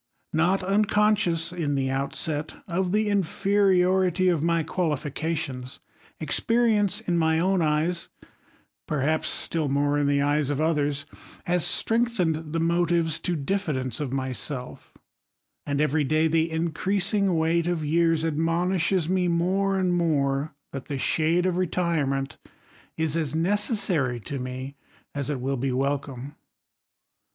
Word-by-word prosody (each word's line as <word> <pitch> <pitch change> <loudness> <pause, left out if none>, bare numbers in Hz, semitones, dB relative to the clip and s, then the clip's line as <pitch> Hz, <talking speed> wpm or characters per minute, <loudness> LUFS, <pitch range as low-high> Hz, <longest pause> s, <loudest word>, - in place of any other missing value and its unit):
Not 180 +5 +2
unconscious, 200 -4 +2
in 155 -5 -1
the 135 -1 0
outset, 145 +3 -2
of 180 0 -1
the 215 +1 +1
infe 200 -5 -1
riority 185 -2 +3
of 160 - -2
my 165 0 +1
qualifications, 150 -4 -3 0.4
experience 210 +5 +1
in 175 -6 0
my 160 0 +2
own 185 +2 +2
eyes, 160 +3 0 0.8
perhaps 155 +2 0
still 160 -4 +1
more 145 +1 +1
in 145 - +1
the 140 0 +2
eyes 145 0 +1
of 145 -1 -1
others, 145 -3 0 0.4
has 175 -1 0
strength 235 +1 +1
ened 160 -3 -1
the 165 - -1
motives 170 -1 +1
to 175 +1 -2
diffidence 140 - -2
of 145 -4 -3
myself: 130 -1 -5 0.7
and 140 0 -1
every 150 0 +2
day 155 +3 +2
the 160 +1 +1
increasing 185 +4 0
weight 165 +1 +1
of 170 -3 -1
years 165 +1 +2
admonishes 170 +2 0
me 180 0 +1
more 190 +3 +1
and 185 -1 +1
more, 145 -4 0 0.2
that 135 -2 -6
the 140 - -4
shade 165 +6 +1
of 180 -1 0
retirement 155 -7 -1 0.6
is 160 -1 0
as 155 -3 -1
necessary 175 - +1
to 135 +6 -5
me 130 +2 -6 0.4
as 140 -1 -3
it 145 -3 -2
will 135 +2 -2
be 130 +2 -1
welcome. 135 +1 -3
160 Hz, 135 wpm, -25 LUFS, 145-180 Hz, 0.8 s, riority